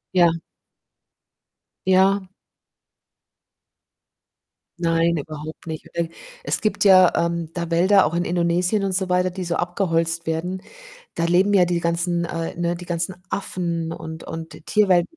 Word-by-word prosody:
Ja. 175 -2 +6 1.6
Ja. 190 +1 +3 2.5
Nein, 165 0 +2
überhaupt 155 +2 -7
nicht 160 -2 -6
und - - -25
e - - -12 0.3
es - - -1
gibt 215 - 0
ja, 185 -3 +7
ähm, 170 -1 -1
da 170 -1 -4
Wälder, 185 +3 +5
auch 155 - -2
in 175 +1 0
Indonesien 175 +3 +1
und 195 - 0
so 185 0 0
weiter, 180 0 +2
die 185 +1 -5
so 170 -1 -2
abgeholzt 165 -2 -1
werden, 180 +4 -2 0.5
da 170 - -1
leben 185 +4 +3
ja 180 -3 +5
die 175 -1 0
ganzen, 170 +1 0
äh 165 -1 -4
ne, 175 0 0
die 180 0 -9
ganzen 175 +1 -2
Affen 170 -4 -3
und 160 0 -8
und 165 0 -7
die - - -13
Tierwelten 190 - +2
175 Hz, 145 wpm, -22 LUFS, 165-185 Hz, 2.5 s, ja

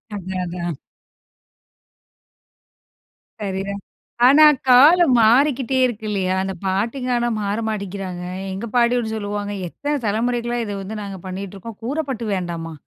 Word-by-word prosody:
அதான், 185 -1 -4
அதான். 175 -1 -4 2.7
சரிதான். 195 0 -3 0.4
ஆனா 285 +5 +7 0.3
காலம் 290 +3 +7
மாறிக்கிட்டே 260 +3 +3
இருக்கு 220 -3 -4
இல்லயா! 190 -2 0
அந்த 190 0 -3
பாட்டிங்க 230 +7 -1
ஆனா 240 0 0
மாற 200 +1 -1
மாட்டிக்கிறாங்க. 195 -4 -5 0.3
எங்க 195 +4 -5
பாட்டிகூட 240 -1 +2
சொல்லுவாங்க, 205 -1 -4
"எத்தன 290 - -4
தலைமுறைக்கலா 240 +3 -1
இத 205 - -4
வந்து 200 +3 -6
நாங்க 195 -2 -6
பண்ணிகிட்டுருக்கோம். 195 +3 -7
கூரப்பட்டு 265 -2 -3
வேண்டாமா! 170 -3 -4
205 Hz, 110 wpm, -21 LUFS, 190-245 Hz, 2.7 s, ஆனா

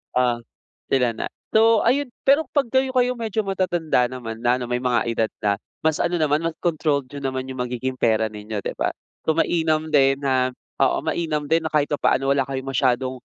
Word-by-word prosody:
Ah, 125 -2 +2 0.5
sila 125 -3 +2
na. 110 - -4 0.2
So, 225 0 +5
ayun 265 +3 +2 0.2
pero 285 +4 +5
'pag 275 -5 +1
kayo-kayo 260 -1 +2
medyo 220 -2 -1
matatanda 175 -8 +1
naman 120 -3 -6
na 120 +1 +3
ano 125 - -4
may 125 0 -1
mga 125 -3 +2
edad 115 -1 0
na, 105 -2 +2 0.3
mas 160 -1 +3
ano 175 0 +1
naman 155 -1 +2
mas 165 -1 -2
controlled 150 -5 0
niyo 140 - -8
naman 130 -1 -3
yung 130 -1 -4
magiging 125 +1 -3
pera 110 -2 +2
ninyo 105 0 -6
'di - - -4
ba? - - +1 0.4
So, 160 - +3
mainam 160 -2 +1
din 135 -1 +4
na 130 -2 +2 0.3
oo 135 - +3
mainam 155 -2 -1
din 165 +1 +3
na - - 0
kahit 145 -1 +2
papaano 135 -2 +1
wala 135 -1 +1
kayong 135 0 -4
masyadong 130 0 +1
140 Hz, 195 wpm, -23 LUFS, 125-165 Hz, 0.5 s, So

